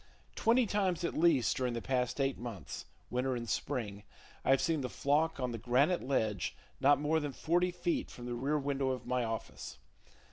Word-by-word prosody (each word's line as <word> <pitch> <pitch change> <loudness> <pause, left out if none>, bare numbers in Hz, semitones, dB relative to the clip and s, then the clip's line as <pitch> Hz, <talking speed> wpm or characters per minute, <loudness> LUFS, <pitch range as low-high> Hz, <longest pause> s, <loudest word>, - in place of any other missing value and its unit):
Twenty 235 +2 +4
times 190 -4 0
at 170 - 0
least 155 -8 +4
during 125 -2 -1
the - - -1
past 125 0 0
eight 135 -1 +1
months 115 -8 -6 0.3
(winter 125 +1 0
and 120 -1 -4
spring) 110 -4 -2 0.4
I - - -1
have 135 0 +6
seen 165 -4 +1
the 125 - -3
flock 150 +4 +1
on 125 -1 -1
the 115 - -4
granite 130 - +3
ledge 110 -8 0 0.2
not 145 +1 +5
more 155 +2 +2
than 145 -3 -3
forty 175 +5 +2
feet 175 -1 -1
from 120 - -9
the 120 - -3
rear 135 +5 0
window 140 -1 0
of 130 -2 -3
my 125 0 0
office. 115 - -5
135 Hz, 190 wpm, -33 LUFS, 120-160 Hz, 0.4 s, have